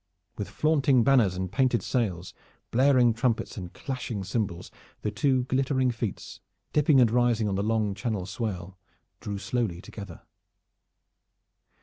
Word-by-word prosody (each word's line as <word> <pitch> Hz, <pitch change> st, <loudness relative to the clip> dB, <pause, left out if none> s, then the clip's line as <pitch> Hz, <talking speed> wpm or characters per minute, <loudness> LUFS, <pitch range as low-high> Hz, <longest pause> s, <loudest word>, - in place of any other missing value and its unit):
With 105 Hz, -, -5 dB
flaunting 140 Hz, -5 st, +3 dB
banners 120 Hz, -9 st, +4 dB
and 95 Hz, 0 st, -3 dB
painted 130 Hz, -3 st, +2 dB
sails, 95 Hz, -8 st, -2 dB, 0.4 s
blaring 125 Hz, -1 st, +4 dB
trumpets 115 Hz, 0 st, -1 dB
and 90 Hz, -3 st, -7 dB
clashing 125 Hz, -6 st, -5 dB
cymbals, 95 Hz, -3 st, -3 dB, 0.3 s
the 105 Hz, -, -1 dB
two 130 Hz, +3 st, +1 dB
glittering 130 Hz, 0 st, +1 dB
fleets, 115 Hz, -4 st, -5 dB, 0.3 s
dipping 150 Hz, -2 st, +4 dB
and 120 Hz, -3 st, +5 dB
rising 120 Hz, -2 st, +2 dB
on 100 Hz, -, -1 dB
the 95 Hz, -, 0 dB
long 110 Hz, -1 st, 0 dB
Channel 100 Hz, -1 st, -3 dB
swell, 95 Hz, -3 st, -5 dB, 0.4 s
drew 100 Hz, -1 st, -5 dB
slowly 100 Hz, -2 st, -2 dB
together. 100 Hz, -2 st, -10 dB
115 Hz, 130 wpm, -27 LUFS, 100-130 Hz, 0.4 s, and